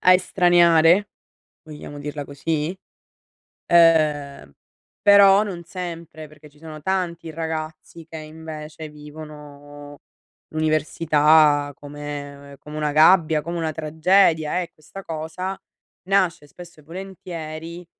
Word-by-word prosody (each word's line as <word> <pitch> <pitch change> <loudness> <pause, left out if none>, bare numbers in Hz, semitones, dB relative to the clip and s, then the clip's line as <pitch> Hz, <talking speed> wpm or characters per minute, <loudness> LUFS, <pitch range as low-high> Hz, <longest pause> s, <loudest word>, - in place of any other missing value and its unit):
a 185 - +6
estraniare, 175 0 +4 0.5
vogliamo 150 -2 -10
dirla 145 0 -6
così, 150 +4 -3 0.9
ehm, 150 - +3 0.5
però 200 0 +7
non 180 -5 -6
sempre 170 -3 -8
perché 150 0 -17
ci 145 - -24
sono 155 -1 -10
tanti 170 -2 -2
ragazzi 160 +1 -6
che 160 -1 -9
invece 155 0 -9
vivono 150 -1 -12 0.5
l'università 155 -1 +2
come 145 -1 -9
come 150 0 -10
una 150 -1 -1
gabbia, 160 0 +5
come 170 +3 -5
una 160 -1 -2
tragedia 160 +1 +2
e 175 -2 -6
questa 160 +6 -12
cosa 165 +4 -5 0.5
nasce 185 -6 +1
spesso 170 +1 -14
e - - -21
volentieri 170 -1 -8
155 Hz, 105 wpm, -22 LUFS, 150-170 Hz, 0.9 s, però